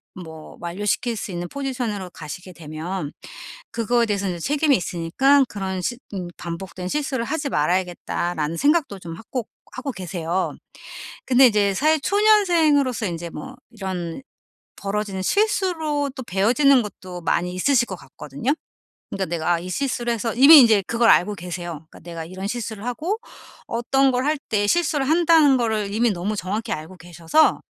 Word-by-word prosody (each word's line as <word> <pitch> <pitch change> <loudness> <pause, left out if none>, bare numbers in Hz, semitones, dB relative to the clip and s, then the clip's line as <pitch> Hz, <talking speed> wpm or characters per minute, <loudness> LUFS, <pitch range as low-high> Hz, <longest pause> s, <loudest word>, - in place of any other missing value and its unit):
뭐 160 -3 -10
완료시킬 205 +7 -1
수 200 - -5
있는 175 0 -4
포지션으로 245 -9 -3
가시게 175 +4 -9
되면 160 0 -5 0.6
그거에 235 +1 +1
대해서 200 -2 -1
이제 175 -1 -4
책임이 290 - +2
있으니까 185 - +2
그런 190 -2 -4
시 240 +7 -2 0.2
음 185 -3 -4
'반복된 180 +1 -6
실수를 270 -3 -1
하지 290 +1 -2
말아야겠다.'라는 175 - -1
생각도 285 - +2
좀 170 -2 -8
하 225 - -12
꼭 245 -4 -3 0.2
하고 265 +2 -4
계세요. 180 -1 -3 0.7
근데 260 +1 +6
이제 205 -4 +2
사회 310 +8 +3
초년생으로서 330 - +3
인제 170 -1 -5
뭐 150 - -8
이런 190 -2 -5 0.5
벌어지는 200 -1 -3
실수로 320 - +1
또 260 - -6
배워지는 245 +8 +3
것도 185 -4 -8
많이 175 +1 0
있으실 245 +6 +3
것 190 - -5
같거든요. 145 - -4 0.6
그러니까 195 -1 -2
내가 170 +1 0
이 180 +2 -7
실수를 240 0 -1
해서 230 0 -2
이미 280 +6 +9
인제 220 -5 +5
그걸 230 0 +4
알고 205 +3 +3
계세요. 175 -3 -6
그러니까 - - -15
내가 165 -1 -7
이런 185 +4 -6
실수를 220 -2 -5
하고 320 - -2 0.5
어떤 265 +4 +2
걸 250 +1 0
할 305 +1 +2
때 205 -1 +2
실수를 300 -2 +1
한다는 320 -4 +5
거를 215 -4 -1
이미 235 +2 +2
너무 195 +2 -2
정확히 210 +4 -3
알고 160 +5 -6
계셔서 175 - +2
210 Hz, 355 characters per minute, -22 LUFS, 175-270 Hz, 0.7 s, 이미